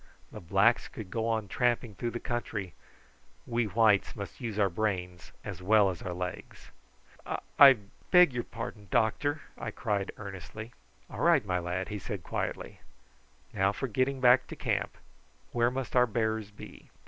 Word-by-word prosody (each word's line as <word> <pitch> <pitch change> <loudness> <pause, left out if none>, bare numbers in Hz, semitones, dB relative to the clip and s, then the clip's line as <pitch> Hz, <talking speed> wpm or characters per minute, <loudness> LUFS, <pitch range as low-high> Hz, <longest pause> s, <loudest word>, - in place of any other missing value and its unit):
The - - -9
blacks 100 +7 +3
could 105 -5 -9
go 115 -1 -1
on 110 -2 0
tramping 120 0 0
through 120 +5 -3
the 120 - -5
country; 110 -6 -4 0.7
we 120 -1 0
whites 105 -1 +3
must 100 +5 -8
use 115 -4 -4
our 100 -2 +4
brains 90 -2 -3
as - - -6
well 100 0 +4
as 90 - -9
our 90 - -4
legs." 90 +1 -6 0.5
"I - - -3 0.2
I 140 -1 +11 0.4
beg 180 -6 +7
your 120 -1 -2
pardon, 110 -3 -7
doctor!" 135 - +1 0.2
I 115 - -4
cried 105 -3 -2
earnestly. 110 +3 -8 0.3
"All - - -9
right, - - +4
my 90 -1 0
lad," 90 +2 -3
he 105 -1 -4
said 100 -3 -6
quietly. - - -4 0.7
"Now 95 -2 +2
for 135 +6 -4
getting 130 +3 0
back 125 0 +5
to - - -7
camp. - - -2 0.5
Where 120 0 +2
must 130 0 -5
our 125 0 +5
bearers 110 -2 -1
be?" 105 - -13
110 Hz, 165 wpm, -30 LUFS, 95-120 Hz, 0.7 s, I